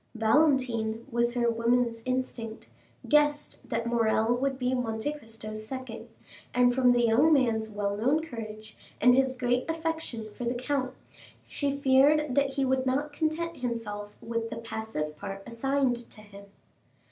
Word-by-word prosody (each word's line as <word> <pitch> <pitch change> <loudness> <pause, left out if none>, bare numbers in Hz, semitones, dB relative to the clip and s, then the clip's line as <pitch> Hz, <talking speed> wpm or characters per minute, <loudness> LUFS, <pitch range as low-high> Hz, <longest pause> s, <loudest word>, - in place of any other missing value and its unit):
Valentine, 230 -2 +2
with 235 +1 +1
her 240 -1 +2
woman's 230 0 +1
instinct, 250 -3 -3 0.4
guessed 295 0 +2
that 230 -1 -3
Morrel 230 -1 +2
would 270 +1 -1
be 250 0 0
Monte 245 +2 -1
Cristo's 220 -5 -8
second, 255 -2 -7 0.5
and 245 0 +5
from 250 -1 +4
the 240 0 +3
young 245 +8 +4
man's 230 -6 +2
well 205 -1 -2
known 260 +9 +2
courage 220 -7 -8 0.2
and 250 +3 +6
his 265 0 +2
great 250 +2 0
affection 320 -8 -3
for - - -6
the 240 +1 -1
count, 255 +1 -2 0.5
she 280 -1 -2
feared 280 +1 +4
that 275 0 +2
he 275 -1 +1
would 260 0 +1
not 290 +3 0
content 325 +2 -2
himself 210 -4 -4
with 230 0 -3
the 225 - -6
passive 220 -9 -4
part 195 -1 -6
assigned 245 0 -1
to 215 - -11
him. 200 -1 -13
245 Hz, 150 wpm, -28 LUFS, 225-270 Hz, 0.5 s, and